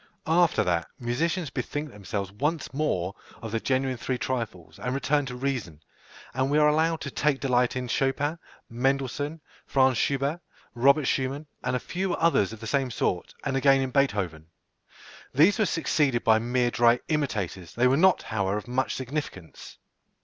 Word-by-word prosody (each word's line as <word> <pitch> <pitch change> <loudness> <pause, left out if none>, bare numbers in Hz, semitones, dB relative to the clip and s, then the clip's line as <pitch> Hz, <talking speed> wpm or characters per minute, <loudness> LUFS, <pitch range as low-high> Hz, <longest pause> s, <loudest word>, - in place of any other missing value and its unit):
_ - - -30 0.2
After 170 +1 +3
that, 85 -3 0
musicians 155 +7 -1
bethink 145 0 -4
themselves 100 -1 -5
once 150 +10 -2
more 100 - -1 0.3
of 110 -2 -7
the 115 - 0
genuine 130 +1 0
three 130 +2 -2
trifles, 115 -10 -4
and 125 +5 -2
return 140 0 +1
to 125 - -5
reason, 125 - -3 0.5
and 130 +1 0
we 145 - +2
are 150 0 +5
allowed 160 +2 +2
to 140 - -5
take 145 0 +1
delight 125 -2 +1
in 125 -1 -3
Chopin, 140 +6 0 0.3
Mendelssohn, 135 +5 -1 0.3
Fr. 130 -1 +4
Schubert, 140 +6 0 0.3
Robert 140 +4 +4
Schumann, 135 +4 -1 0.2
and 125 0 0
a - - 0
few 185 +4 -2
others 165 - +2
of 115 -1 -10
the - - -6
same 135 +2 0
sort, 90 -6 -2
and 135 -1 -1
again 135 0 +4
in 130 -1 -1
Beethoven. 95 - 0 0.9
These 175 - +5
were 215 - +3
succeeded 145 -7 +1
by 110 -1 +5
mere 120 +1 +1
dry 120 0 +4
imitators; 100 - -2
they 120 - +2
were 130 +1 +5
not, 185 +5 +4
however, 100 -2 -1
of 105 +2 -7
much 130 +2 -1
significance. 130 - -6
130 Hz, 170 wpm, -27 LUFS, 115-145 Hz, 0.9 s, are